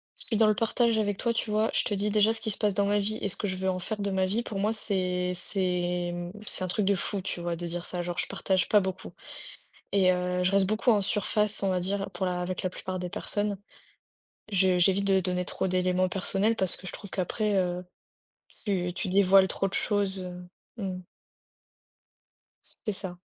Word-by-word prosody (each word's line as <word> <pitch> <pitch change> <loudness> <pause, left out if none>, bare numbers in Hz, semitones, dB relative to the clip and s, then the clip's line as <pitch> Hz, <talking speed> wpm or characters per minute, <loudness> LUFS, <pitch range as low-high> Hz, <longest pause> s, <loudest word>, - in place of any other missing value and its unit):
je - - -1
suis 220 - +1
dans 220 - +5
le 215 - +4
partage 230 0 +1
avec 205 -2 -1
toi, 235 -1 0
tu 230 - -2
vois, 215 +1 +1
je - - +3
te 205 - -2
dis 205 +2 0
déjà 215 +1 +4
ce 225 - +3
qui 220 - +1
se - - 0
passe 210 -2 +1
dans 200 -1 +2
ma 205 +1 +2
vie 215 +2 -1
et 200 - -1
ce - - -3
que 205 - -3
je 185 - -2
veux 190 0 -1
en 185 0 -1
faire 210 +4 -4
de 200 - -1
ma 190 -1 +1
vie 215 +6 0
pour 195 -4 -5
moi 215 +3 +1
c'est 180 -4 0
c'est, 180 -1 -1
mmh, 175 0 -5
c'est 185 - +2
un - - -1
truc 190 +3 0
de 200 - +3
fou, 195 +1 -1
tu 175 - -4
vois, 170 0 -2
de 175 +1 -4
dire 170 +1 -3
ça, 180 -1 -3
genre 175 0 -5
je - - 0
partage 190 -1 0
pas 210 - +6
beaucoup 190 -1 -5 0.8
et 190 -2 +4
heu, 180 0 -1
je 185 - +2
reste 195 -1 +4
beaucoup 215 +3 +2
en 205 -2 +3
surface, 210 +1 +2
on 195 - +2
va 185 -1 +1
dire, 195 +2 -1
pour 180 +1 -3
la 180 -1 -1
avec 180 0 -3
la 185 - 0
plupart 185 0 -5
des 180 -1 -4
personnes. 205 +1 0 1.0
Je 185 -1 +3
j'évite 190 +2 +3
de 195 -1 +4
donner 180 0 -1
trop - - -2
d'éléments 185 0 +1
personnels 195 +4 0
parce 190 -2 +1
que 185 - -11
je - - -3
trouve 200 - -8
qu'après, 205 +3 -1
heu, 180 -1 -1 0.7
tu 180 -4 -2
tu 190 - -3
dévoiles 190 0 +5
trop 195 - 0
de 195 - -9
choses, 200 -2 +1 0.6
heu, 210 - -5
mmh. 185 -1 -4 1.6
C'est 215 - -2
ça. 185 -2 -2
190 Hz, 230 wpm, -28 LUFS, 180-205 Hz, 1.6 s, pas